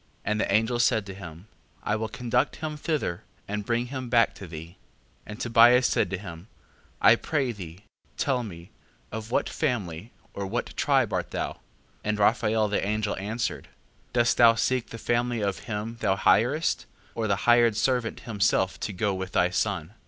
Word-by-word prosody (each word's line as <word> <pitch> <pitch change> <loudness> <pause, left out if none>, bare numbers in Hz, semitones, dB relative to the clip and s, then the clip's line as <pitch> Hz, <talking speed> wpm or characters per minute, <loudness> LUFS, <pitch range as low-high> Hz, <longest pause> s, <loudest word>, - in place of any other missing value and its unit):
5:15. - - -37 0.2
And 105 0 0
the - - -1
angel 110 +4 +2
said 110 -3 +2
to 95 - -7
him: 90 -2 -10 0.4
I 105 - 0
will 110 +1 -2
conduct 125 -5 0
him 155 -1 -5
thither, 145 - -2 0.3
and 105 +1 -3
bring 120 +1 +1
him 130 -2 -4
back 115 -2 +4
to 95 - -10
thee. 80 0 -8
5:16. 85 - -20 0.5
And 105 0 -8
Tobias 120 +2 +6
said - - +1
to 95 - -2
him: 90 -1 -9 0.5
I 115 - +7
pray 135 0 -1
thee, 90 -3 -10 0.3
tell 130 -3 +1
me, 85 -6 -9 0.4
of 110 +1 -6
what - - +1
family, 110 - -3 0.2
or 100 -1 -4
what - - -3
tribe - - +2
art - - -1
thou? - - -3
5:17. - - -25 0.5
And 105 0 0
Raphael 110 0 +2
the 105 - -1
angel 105 +1 -1
answered: 110 +5 -3 0.4
Dost 120 -1 +2
thou 115 -1 +7
seek 125 +2 0
the 115 - -7
family 120 0 0
of 100 -2 -1
him 110 +2 -4
thou 100 -3 +2
hirest, 125 +11 +2 0.3
or 115 -1 -2
the 100 - +2
hired 120 -2 +5
servant 125 -3 0
himself 100 -3 0
to - - -3
go 100 +1 -1
with 95 0 -5
thy 90 0 +3
son? 95 -2 -1
110 Hz, 185 wpm, -26 LUFS, 100-120 Hz, 0.5 s, I